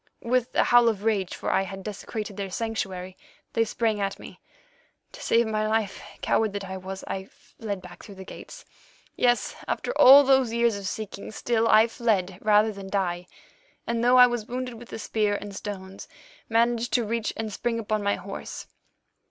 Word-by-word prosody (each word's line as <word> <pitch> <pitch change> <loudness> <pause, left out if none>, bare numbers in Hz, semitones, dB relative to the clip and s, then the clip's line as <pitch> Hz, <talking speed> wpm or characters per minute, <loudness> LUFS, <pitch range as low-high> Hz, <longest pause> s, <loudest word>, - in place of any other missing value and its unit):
"With 250 +1 0
a - - +5
howl 240 -1 +5
of 205 -3 -3
rage, 205 -5 0
for - - -3
I - - +3
had 195 0 -6
desecrated 210 0 -6
their 200 -1 -4
sanctuary, 190 -4 -4 0.4
they 230 - +3
sprang 220 -1 -1
at 195 -1 -2
me. - - -12 0.7
To - - -12
save 235 +1 +3
my 215 -1 -1
life, 215 -2 -1 0.2
coward 220 -2 +1
that 205 -1 -4
I 190 0 -6
was, 190 +1 -7
I 190 0 -4
fled 200 -1 -8
back 175 -1 -12
through 200 - -12
the 190 - -9
gates. - - -11 0.5
Yes, 245 -1 +1
after - - -2
all 275 +3 +10
those 265 -3 +3
years 235 -2 +2
of 200 -1 -5
seeking, 205 -1 -6
still 230 +1 0
I 220 0 +6
fled 195 -6 -1
rather 215 +1 +4
than 195 -2 -9
die, 180 -3 -1 0.6
and 235 0 -1
though 250 +1 +5
I 250 - +10
was 240 -3 -2
wounded 250 0 -4
with 235 +1 -12
a - - -5
spear 215 -2 0
and 205 -1 -7
stones, 195 -1 -7 0.4
managed 235 +1 +1
to 240 -3 +2
reach 230 0 -1
and 220 -2 -4
spring 235 +2 -2
upon 215 -1 -1
my 200 0 +1
horse. 195 +2 -7
215 Hz, 185 wpm, -26 LUFS, 195-235 Hz, 0.7 s, all